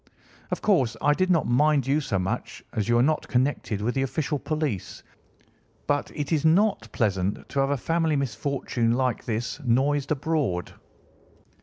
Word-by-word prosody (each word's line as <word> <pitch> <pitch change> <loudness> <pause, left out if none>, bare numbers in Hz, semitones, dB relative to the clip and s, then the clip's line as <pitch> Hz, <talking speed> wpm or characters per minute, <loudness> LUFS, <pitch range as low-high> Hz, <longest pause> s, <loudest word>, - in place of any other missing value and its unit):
Of - - -3
course, 130 - +2
I 145 +1 +3
did 185 +4 0
not 170 -4 +3
mind 145 +2 +3
you 140 +3 +2
so 110 -8 -1
much, 95 +1 -3
as 105 0 -1
you 120 - +4
are 120 - +4
not 155 +2 +1
connected 125 -5 0
with 120 +3 0
the 135 - 0
official 145 +2 -1
police, 145 - -3 0.8
but 145 0 0
it 145 +1 -3
is 155 -3 +2
not 160 - +2
pleasant 100 -3 -1
to 140 - -2
have 135 0 +2
a 145 - +1
family 165 +3 0
misfortune 135 -3 -1
like 125 -1 0
this 115 +3 -3
noised 135 +3 +1
abroad. 145 - -1
135 Hz, 165 wpm, -26 LUFS, 115-150 Hz, 0.8 s, you